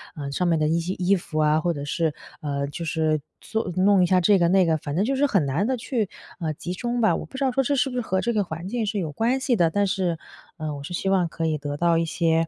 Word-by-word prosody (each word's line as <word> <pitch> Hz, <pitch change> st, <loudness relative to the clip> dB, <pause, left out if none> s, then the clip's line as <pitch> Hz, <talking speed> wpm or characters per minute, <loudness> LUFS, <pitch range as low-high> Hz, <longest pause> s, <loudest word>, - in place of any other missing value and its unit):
呃， 140 Hz, -2 st, -5 dB
上 180 Hz, +5 st, 0 dB
面 165 Hz, -2 st, +3 dB
的 155 Hz, 0 st, +1 dB
一 165 Hz, +2 st, +2 dB
些 180 Hz, +3 st, -2 dB
衣 185 Hz, +2 st, +2 dB
服 160 Hz, -3 st, -5 dB
啊， 155 Hz, 0 st, +4 dB
或 175 Hz, 0 st, +1 dB
者 145 Hz, -1 st, -5 dB
是， 160 Hz, +2 st, 0 dB, 0.3 s
呃， 140 Hz, -2 st, -2 dB
就 155 Hz, +4 st, -6 dB
是 155 Hz, -2 st, 0 dB, 0.2 s
做 220 Hz, -5 st, -2 dB
弄 190 Hz, +1 st, +4 dB
一 -, -, +3 dB
下 185 Hz, 0 st, +4 dB
这 195 Hz, +2 st, +5 dB
个 170 Hz, -, +4 dB
那 185 Hz, +1 st, +4 dB
个， 160 Hz, -, +2 dB
反 145 Hz, 0 st, -5 dB
正 195 Hz, -, +2 dB
就 270 Hz, +3 st, 0 dB
是 285 Hz, +2 st, +3 dB
很 195 Hz, -, +2 dB
难 160 Hz, -, 0 dB
地 260 Hz, -, 0 dB
去， 230 Hz, -4 st, -2 dB, 0.3 s
呃， 160 Hz, -3 st, -1 dB
集 180 Hz, +4 st, -5 dB
中 240 Hz, +4 st, -2 dB
吧。 215 Hz, -7 st, +3 dB
我 -, -, -4 dB
不 265 Hz, -, -9 dB
知 275 Hz, -, -1 dB
道 260 Hz, -, +2 dB
说 270 Hz, -, +2 dB
这 285 Hz, +3 st, +1 dB
是 270 Hz, 0 st, +1 dB
不 250 Hz, -, -6 dB
是 245 Hz, -, 0 dB
和 190 Hz, -4 st, -1 dB
这 235 Hz, -, 0 dB
个 210 Hz, -2 st, +2 dB
环 170 Hz, +1 st, -6 dB
境 225 Hz, 0 st, -2 dB
是 210 Hz, -, -2 dB
有 165 Hz, -6 st, -2 dB
关 235 Hz, -, +1 dB
系 260 Hz, -2 st, +1 dB
的， 170 Hz, -5 st, +3 dB
但 200 Hz, +4 st, +1 dB
是， 180 Hz, -4 st, 0 dB, 0.4 s
呃， 155 Hz, -2 st, -4 dB
我 140 Hz, -, -7 dB
是 175 Hz, +5 st, -4 dB
希 190 Hz, -, -1 dB
望 185 Hz, -3 st, +3 dB
可 165 Hz, 0 st, -3 dB
以 155 Hz, -1 st, +1 dB
得 145 Hz, 0 st, -4 dB
到 170 Hz, +1 st, +3 dB
一 -, -, +1 dB
些， 165 Hz, 0 st, +1 dB
175 Hz, 320 characters per minute, -24 LUFS, 160-210 Hz, 0.4 s, 这